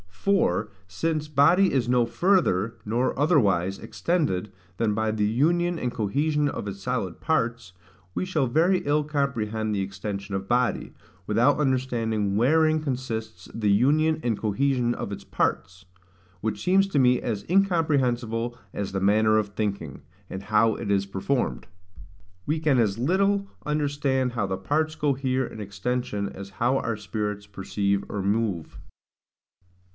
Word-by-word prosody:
For, 105 - +1 0.2
since 155 - -2
body 155 +7 +4
is 125 -3 +1
no 125 -1 +3
further, 115 - +1
nor 120 +4 0
otherwise, 100 - +2
extended, 145 - -1 0.3
than 110 -2 +1
by 110 +1 0
the 110 -1 0
union 170 +10 +1
and 125 - -2
cohesion 145 +7 0
of 120 - -4
its 100 0 -6
solid 95 -2 -3
parts, 120 - -1 0.4
we - - -1
shall 160 -7 0
very 165 +9 +3
ill 150 +1 +1
comprehend 115 -7 -1
the 100 - 0
extension 100 +1 -5
of 95 0 -4
body, 125 +2 0 0.3
without 120 +9 +3
understanding 115 -7 0
wherein 155 +7 +3
consists 115 -8 -4
the 105 -3 +1
union 155 +9 +3
and 115 -4 0
cohesion 120 +3 +1
of 100 - -5
its 100 - -6
parts; 90 +1 -2 0.5
which 105 0 -3
seems 195 +2 +4
to 150 - +1
me 125 -1 +4
as 105 -4 -3
incomprehensible 130 - +1 0.2
as 100 -1 -3
the 95 0 -2
manner 110 +2 +4
of 105 -1 -2
thinking, 100 -8 -4 0.3
and 95 +1 -6
how 110 +2 +3
it 100 - -3
is 100 0 +1
performed. 110 +7 -2 0.8
We 155 +2 0
can 150 -4 +2
as 110 -3 +1
little 195 +8 +1 0.2
understand 145 -4 0
how 115 -4 -1
the 95 -1 -2
parts 155 +11 0
cohere 130 -3 0
in 110 - -9
extension 105 +1 -3
as 100 +1 -9
how 125 +3 +3
our 115 -4 -2
spirits 105 0 -4
perceive 100 0 -1
or 100 - -3
move. 100 -4 -1
120 Hz, 145 wpm, -25 LUFS, 100-145 Hz, 0.8 s, body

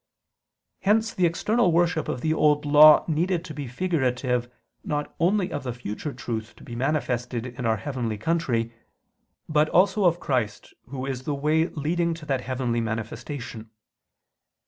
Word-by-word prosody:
Hence 220 +3 +2
the 180 -2 +3
external 205 +4 +1
worship 170 -1 +1
of 125 - -3
the 155 +3 +1
Old 150 -2 +2
Law 150 +1 +8
needed 170 +2 0
to 155 - -7
be 145 -2 -5
figurative 125 -5 -1 0.3
not 150 -1 -3
only 185 +2 +2
of 145 - -3
the 125 -2 -4
future 125 +4 -5
truth 115 -3 -5
to - - -16
be 120 - -8
manifested 125 -3 -1
in 125 -1 -4
our 110 0 +2
heavenly 120 -5 -3
country, 120 -4 -1 0.7
but 155 0 +2
also 195 +2 +3
of 175 0 +3
Christ, 120 -9 -2
Who 130 0 -5
is 135 -2 -3
the 145 - -1
way 155 +3 +2
leading 170 +2 -1
to 160 -2 -11
that 135 -3 -1
heavenly 125 -2 -1
manifestation. 110 +1 -5
145 Hz, 155 wpm, -25 LUFS, 125-165 Hz, 0.7 s, Law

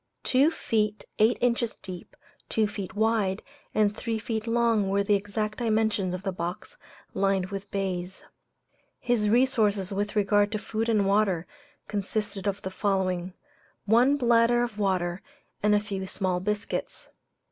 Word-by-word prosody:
Two 270 +4 +4
feet 215 -9 -1
eight 220 +3 +4
inches 235 -2 +1
deep, 180 -2 -10 0.3
two 220 - +2
feet 205 -2 -6
wide, 215 -3 +1 0.3
and 210 -1 +3
three 225 0 -2
feet 220 0 -3
long 230 -3 +2
were 200 +1 +2
the 205 - +2
exact 210 +2 -1
dimensions 220 -5 +1
of 185 - -8
the 195 - -1
box, 180 - -5 0.4
lined 195 -1 +1
with 200 0 -6
baize. 190 -2 -3 0.8
His 225 -4 +1
resources 215 -5 +2
with 205 +2 -2
regard 205 0 +3
to - - +1
food 220 +2 -3
and 210 -3 +3
water 195 -4 +2 0.4
consisted 205 0 -3
of 200 0 -2
the 190 - -4
following: 185 -2 -1 0.5
One 245 +7 +4
bladder 240 -1 +4
of 225 -3 -5
water 185 -2 0 0.4
and 210 0 +4
a - - +4
few 195 -2 -5
small 185 -1 0
biscuits. 210 +2 -3
205 Hz, 145 wpm, -27 LUFS, 195-225 Hz, 0.8 s, Two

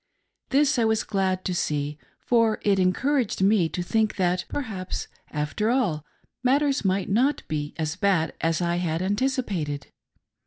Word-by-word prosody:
This 285 0 +3
I - - +3
was 220 0 +2
glad 190 -2 -1
to 185 - 0
see, 150 -3 -2 0.3
for 230 -2 +3
it 200 -2 +3
encouraged 240 +7 +1
me 195 -4 +4
to 180 - -3
think 220 +4 +1
that, 180 -1 0
perhaps, 200 -9 -4 0.2
after 150 +9 -1
all, 210 - +1 0.4
matters 275 +1 +2
might 190 0 +1
not 260 +8 +2
be 150 -1 -3
so 155 +2 -3
bad 185 -6 +2
as 165 +1 +1
I 170 0 0
had 170 -1 -1
anticipated. 200 - -1
195 Hz, 150 wpm, -25 LUFS, 170-230 Hz, 0.4 s, me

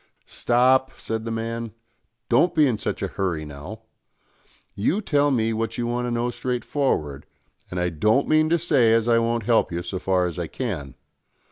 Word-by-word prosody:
"Stop," 130 +2 +2
said 110 0 -4
the - - -3
man, 115 0 -4 0.5
"don't 165 +9 +3
be 155 -2 +5
in 120 -6 0
such - - -3
a - - -3
nurry 85 -5 -1
now. 75 +10 -9 0.9
You 110 - 0
tell 145 -8 +2
me 115 -4 +1
what 115 +1 -3
you 120 - -1
want 120 +1 -1
to - - -2
know 120 +1 -1
straightforward, 125 - -2 0.4
and 90 - -4
I 90 0 +1
don't 105 - +2
mean 155 0 +3
to 170 - +3
say 140 -9 +3
as 115 0 +2
I 115 -1 +4
won't 115 0 0
help 115 -2 +2
you 85 0 -3
so 95 +1 -4
far 90 -1 +1
as 90 0 -4
I 85 - -3
can. 80 - -5
115 Hz, 190 wpm, -24 LUFS, 95-130 Hz, 0.9 s, be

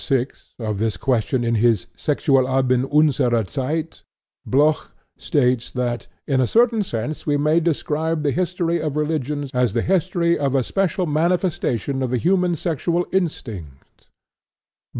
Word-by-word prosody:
VI) 135 -3 +2 0.3
of 110 -4 -3
this 110 -4 -1
question 125 +1 0
in 115 0 0
his 115 -3 +2
Sexualleben 130 -3 +1
unserer 130 -7 +3
Zeit, 150 - -3 0.5
Bloch 150 +4 +2 0.2
states 125 -5 0
that 120 -1 -2 0.2
"in 135 -2 +1
a 125 - +2
certain 230 - +3
sense 150 - -4
we 145 -1 +2
may 155 +3 +3
describe 160 -1 -1
the 145 - +1
history 175 0 -1
of 150 -2 -2
religions 150 -2 -2
as 125 -4 +1
the 115 - 0
history 175 -2 +1
of 140 -2 0
a 130 - +2
special 185 +3 0
manifestation 155 - 0
of 130 - -1
the 125 - 0
human 180 +4 +2
sexual 170 +2 -1
instinct." 110 - -4
145 Hz, 140 wpm, -21 LUFS, 125-165 Hz, 0.5 s, unserer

